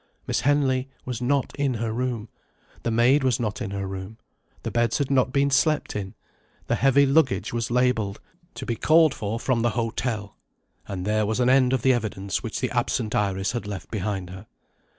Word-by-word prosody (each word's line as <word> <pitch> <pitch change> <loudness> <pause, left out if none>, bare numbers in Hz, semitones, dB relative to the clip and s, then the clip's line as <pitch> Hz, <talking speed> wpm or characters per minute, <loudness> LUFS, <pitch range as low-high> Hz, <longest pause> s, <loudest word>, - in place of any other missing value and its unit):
Miss - - 0
Henley 135 -2 +2 0.2
was 125 -1 -4
not 135 +2 0
in 140 -3 0
her 115 0 -2
room; 120 -2 -2 0.5
the - - -2
maid 120 +5 +4
was 130 -3 +2
not 110 0 -3
in 105 - -3
her 100 0 -3
room; 95 +3 -6 0.5
the - - -3
beds 120 -1 +1
had 140 -2 -1
not 130 -2 +3
been 140 +1 +2
slept 150 +2 +2
in; 95 -2 -5 0.5
the - - -1
heavy 135 +2 +4
luggage 140 -3 +2
was 115 -1 -1
labelled 120 -5 +1 0.4
"To - - -6
be 115 - -1
called 160 +3 +4
for 110 +2 -3
from 125 -1 0
the 120 - +2
hotel." 115 -2 -2 0.5
And 95 -2 -4
there 105 0 +1
was 110 +3 -1
an 125 0 +4
end 130 -1 +4
of 130 -3 0
the 130 - +5
evidence 100 -4 -2
which 115 - -4
the 125 - -1
absent 120 -2 -1
Iris 95 -1 0
had 120 -3 -4
left 100 -2 -7
behind 95 -3 -3
her. 95 +3 -10
120 Hz, 195 wpm, -25 LUFS, 105-130 Hz, 0.5 s, the